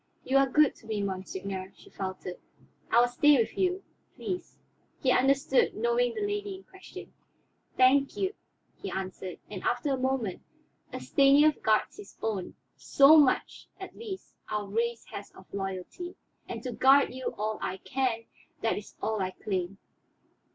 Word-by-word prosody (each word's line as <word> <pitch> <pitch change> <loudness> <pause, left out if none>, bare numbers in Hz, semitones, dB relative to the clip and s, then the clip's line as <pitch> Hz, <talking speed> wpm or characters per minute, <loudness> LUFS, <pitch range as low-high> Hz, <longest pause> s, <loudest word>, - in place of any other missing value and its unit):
"You 270 - +2
are 275 -1 +3
good 300 +2 +4
to 225 - -17
me, 210 -2 -2
monseigneur," 190 0 -5
she - - -18
faltered. 185 -2 -5 0.5
"I 235 - +5
will 245 - +5
stay 290 +4 +5
with 230 - 0
you, 370 0 0 0.3
please." 365 -1 -5 0.4
He 260 - +2
understood, 275 - +3
knowing 480 0 +1
the 425 -2 -1
lady 410 -1 -3
in 380 - -13
question. 380 0 -12 0.6
"Thank 270 +2 +4
you," 385 +1 0 0.5
he - - -4
answered, 185 -1 -5
and 195 -3 -7
after 245 +4 0
a - - 0
moment, 255 -7 -1 0.5
"A - - -5
Stanief 285 +2 +4
guards 215 -1 +1
his 410 - -12
own; 210 -5 -3 0.2
so 280 +3 +6
much, 290 -4 +3
at - - -9
least, 415 -5 -8 0.2
our 210 -1 -2
race 230 +3 -1
has 200 - -7
of 190 - -14
loyalty. 195 - -5 0.3
And - - -5
to 255 - -3
guard 270 +2 +5
you 260 0 -4
all 215 +1 -2
I 185 - -3
can, 250 -1 -1 0.4
that 225 - +1
is 205 - -14
all 220 -2 0
I 185 - 0
claim. 185 0 -3
250 Hz, 160 wpm, -29 LUFS, 200-300 Hz, 0.6 s, so